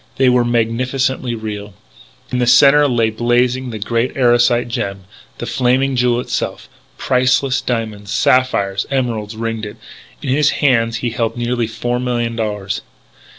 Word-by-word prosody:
They 130 -1 +4
were 125 -1 +3
magnificently 120 +2 -1
real. 105 -2 -6 0.6
In 125 - -1
the 125 - +1
centre 140 +4 +6
lay 115 -4 +1
blazing 120 +3 +1
the 110 - -5
great 115 +5 -2
Erosite 120 -1 +3
gem, 100 -4 -3 0.4
the - - -5
Flaming 130 +2 +1
Jewel 120 -1 +2
itself. - - -4 0.3
Priceless 130 +1 +1
diamonds, 110 -4 -4
sapphires, 100 -6 +1
emeralds 115 -5 -2
ringed 115 -1 -3
it. 105 - -10 0.5
In - - -3
his 145 +3 +3
hands 115 -5 +2
he 120 - 0
held 115 0 -2
nearly 120 -1 -1
four 120 +2 -2
millions 120 -2 -1
of - - +2
dollars. 105 -3 -3
120 Hz, 150 wpm, -17 LUFS, 115-125 Hz, 0.6 s, centre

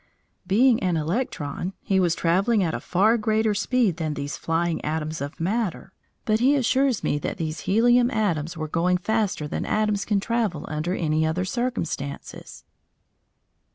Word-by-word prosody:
Being 230 +5 +4
an 180 -3 +1
electron, 165 - -3
he 190 -1 +2
was 175 -2 +2
travelling 195 +5 +2
at 165 -2 -1
a - - -2
far 215 +6 +2
greater 215 0 +1
speed 215 -3 +1
than 155 -3 -2
these 145 0 -4
flying 165 +1 -1
atoms 155 0 -3
of 140 +1 -6
matter, 195 +1 -2 0.3
but 215 0 +2
he 265 +4 +4
assures 265 -2 +1
me 145 - 0
that - - -4
these 160 -1 -3
helium 240 +4 +4
atoms 170 - -1
were 155 0 -3
going 175 +4 +1
faster 205 -5 -1
than - - -3
atoms 210 -2 0
can 205 -2 +1
travel 210 -8 -1
under 155 +4 -2
any 155 -1 0
other 160 +4 0
circumstances. 185 - -4
185 Hz, 155 wpm, -24 LUFS, 160-220 Hz, 0.3 s, Being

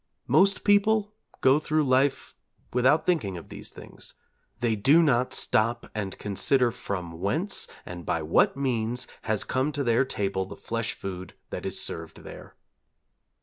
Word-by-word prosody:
Most 195 0 +3
people 210 +1 +3 0.3
go 135 +3 +5
through 155 0 +1
life 135 +1 +1 0.4
without 130 +6 +3
thinking 120 - 0
of 85 - -11
these - - -7
things: - - -10 0.4
they 115 -2 +1
do 140 +11 +5
not 130 -4 +2
stop 115 +2 0
and 100 -3 -4
consider 120 +5 +2
from 90 -6 -5
whence 155 - -1 0.2
and 90 -1 -8
by 80 - -1
what 80 - +3
means 125 -3 -1 0.2
has 110 -2 +1
come 130 +3 0
to 145 - -1
their 120 +1 +3
table 100 -6 -2
the - - -9
flesh 115 0 -3
food 95 -1 -7 0.2
that - - -4
is - - -1
served 80 -1 -4
there. - - -11
120 Hz, 150 wpm, -27 LUFS, 100-145 Hz, 0.4 s, go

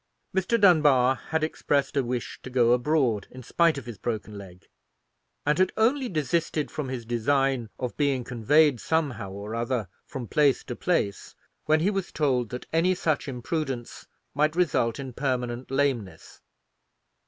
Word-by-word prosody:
Mr. 190 +5 +1
Dunbar 150 - +5
had 160 -1 0
expressed 145 -3 0
a 140 - +2
wish 125 0 -4
to - - -8
go 120 -2 +3
abroad, 125 -4 +1
in 130 0 -11
spite 165 +4 +2
of 140 - -6
his 115 -6 -8
broken 110 -2 -4
leg, 95 -3 -12 0.8
and 150 +3 +2
had 185 0 +3
only 250 +4 +2
desisted 155 -1 -1
from 150 -3 -4
his 125 -3 -5
design 125 +1 +1
of 125 -2 -4
being 140 -4 +1
conveyed 135 +4 +3
somehow 140 -12 -1
or 100 +3 -7
other 115 -2 -1 0.2
from 130 -4 -6
place 145 +3 +2
to 120 - -6
place, 105 - -1 0.3
when 155 0 +3
he 195 +5 +2
was 195 -3 -3
told 130 -6 0
that 125 - -6
any 180 +3 +3
such 155 -5 -1
imprudence 130 -1 -4 0.3
might 150 +3 +1
result 130 -10 +1
in 135 -2 -6
permanent 125 -2 -2
lameness. 135 -7 -2
135 Hz, 155 wpm, -26 LUFS, 120-155 Hz, 0.8 s, Dunbar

